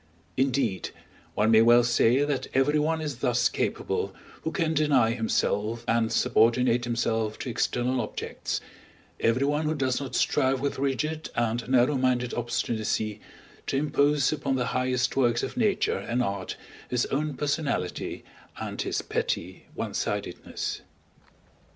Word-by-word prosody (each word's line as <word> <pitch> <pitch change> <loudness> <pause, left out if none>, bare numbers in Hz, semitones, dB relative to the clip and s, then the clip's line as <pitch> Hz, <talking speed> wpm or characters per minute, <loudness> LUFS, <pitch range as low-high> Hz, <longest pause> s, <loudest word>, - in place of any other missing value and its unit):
Indeed, 130 -8 0 0.5
one 110 +2 +3
may 110 0 +7
well 120 +1 +6
say 120 +3 +3
that 145 -3 -2
everyone 150 +4 +2
is 145 -5 -4
thus - - +2
capable - - -2 0.3
who 160 - -2
can 165 -3 0
deny 145 -7 +3
himself 115 -1 0
and 115 0 +2
subordinate 120 +2 +3
himself 115 -2 -1
to 125 - -4
external 125 +2 0
objects, 110 - -4 0.6
everyone 140 +6 +1
who 155 +1 0
does 130 -2 0
not 130 -3 -5
strive 130 0 +2
with 140 0 -2
rigid 150 +4 -1
and 120 +1 -1
narrow 130 +2 +4
minded 125 -1 +1
obstinacy 110 -2 -2 0.5
to 135 - 0
impose 145 -1 +2
upon 140 -3 -1
the 125 -1 0
highest 125 0 0
works 120 -3 +2
of - - -4
Nature 215 - +1
and 120 +5 -1
Art 100 -3 -3 0.3
his 125 -1 +1
own 150 +1 -1
personality 145 - -2 0.4
and - - -4
his - - -2
petty 90 +1 -3
onesideness. - - -3
125 Hz, 130 wpm, -27 LUFS, 115-140 Hz, 0.6 s, may